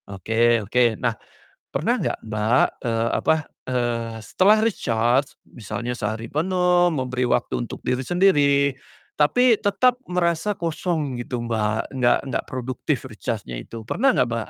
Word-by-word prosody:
Oke 115 +5 +2
oke. 120 +1 +2
Nah, 120 -2 0 0.6
pernah - - 0
nggak - - -2
Mbak, 110 +1 +2 0.2
eee, 115 0 0
apa, - - +3 0.3
eee, 120 -2 -1
setelah 200 - +4
recharge, 125 - 0
misalnya 120 +1 -5
sehari 110 +1 -3
penuh, 180 +2 +2
memberi 130 -3 -1
waktu 120 - 0
untuk - - -8
diri 125 0 0
sendiri. 145 -6 +3 0.4
Tapi 230 +10 +4
tetap 245 +5 +2
merasa 180 +2 0
kosong 160 -5 -2
gitu 120 0 -4
Mbak, 110 0 -1
nggak 125 -2 +3
nggak 130 - -2
produktif 130 -1 -3
recharge-nya - - -5
itu, 115 - -9
pernah 270 - +2
nggak 125 -3 +2
Mbak? 115 -2 -3
125 Hz, 135 wpm, -23 LUFS, 115-170 Hz, 0.6 s, setelah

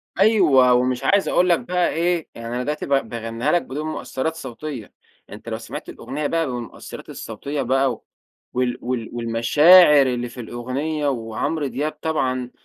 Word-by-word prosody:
أيوه، 170 - +5
ومش 125 0 +1
عايز 200 0 +3
أقول 180 +1 +3
لك 170 - +4
بقى 180 -1 0
إيه، 170 0 0
يعني 115 0 -7
أنا 125 - -2
دلوقتي 150 +3 -3
ب - - -10 0.2
باغنيها 115 +4 -2
لك 175 - +3
بدون 150 +4 -5
مؤثرات 155 0 -3
صوتية، 130 -4 -7 0.4
أنت - - -10
لو - - -3
سمعت - - -8
الأغنية 145 +2 -4
بقى 165 +1 0
بالمؤثرات 120 -2 -8
الصوتية 145 0 -5
بقى، 130 -2 0 0.5
وال 125 -1 0
وال 120 -2 -3
والمشاعر 140 +7 +6
اللي 120 -1 -2
في 120 - -12
الأغنية، 135 +6 -3
وعمرو 130 +4 -2
دياب 140 +5 -2
طبعًا 130 -6 -1
135 Hz, 155 wpm, -22 LUFS, 125-155 Hz, 0.5 s, والمشاعر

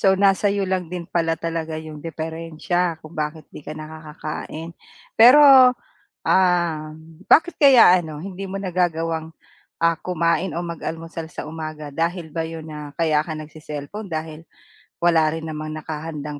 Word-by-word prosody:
So, 195 - +4
nasa 195 +1 +4
iyo 200 -1 0
lang 185 -1 0
din 175 -2 -4
pala 165 -1 +2
talaga 165 -1 -3
iyong 155 -1 -9
diperensiya 165 +2 -3 0.2
kung 155 +2 -12
bakit 150 0 -6
hindi - - -10
ka - - -5
nakakakain 155 +1 -7 0.5
pero 270 +6 +9 0.9
ah. 180 -2 +3 0.6
Bakit 350 +2 +5
kaya 265 -5 +8 0.2
ano 155 -3 -8
hindi 195 +1 -7
mo 195 - -4
nagagawang 165 -3 -1 0.6
ah 165 -1 +2
kumain, 170 +1 0
o - - -1
mag-almusal 165 0 -6
sa - - -6
umaga 155 -2 -6 0.2
dahil 170 0 -1
ba 165 - -1
iyon, 160 -1 -8
na 150 0 -7 0.2
kaya 155 -2 +2
ka 160 - -4
nag-cecellphone 155 +6 -8
dahil 155 0 -6 0.6
wala 170 -2 +5
rin 160 0 -5
namang 155 0 -5
nakahandang 150 -1 -6
165 Hz, 145 wpm, -22 LUFS, 155-175 Hz, 0.9 s, pero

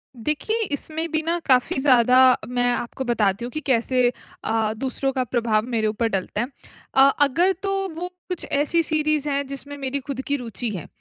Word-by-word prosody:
देखिए, 300 - -2
इसमें 315 +3 -3
भी 315 - +1
ना 335 +1 +1
काफ़ी 255 0 +2
ज़्यादा 250 -2 +5 0.3
मैं 245 0 +1
आपको 240 +2 -3
बताती 220 -2 +1
हूँ 245 - -7
कि 310 - -3
कैसे 250 -1 +3 0.3
अ, 220 -1 0
दूसरों 270 +2 -2
का 255 -1 0
प्रभाव 230 -3 0
मेरे 225 -3 0
ऊपर 220 +2 0
डलता 195 +1 -2
है। 240 - -2 0.5
अ, 270 - +5 0.2
अगर 310 +7 +4
तो 395 - 0 0.2
वो 350 +2 -3 0.2
कुछ 360 - -3
ऐसी 300 +4 +2
सीरीज 305 -1 +1
है 280 -1 0
जिसमें 280 +1 -8
मेरी 275 0 -2
खुद 265 -1 -5
की 285 - +2
रुचि 235 -1 -4
है, 170 - -7
260 Hz, 185 wpm, -23 LUFS, 235-290 Hz, 0.5 s, ज़्यादा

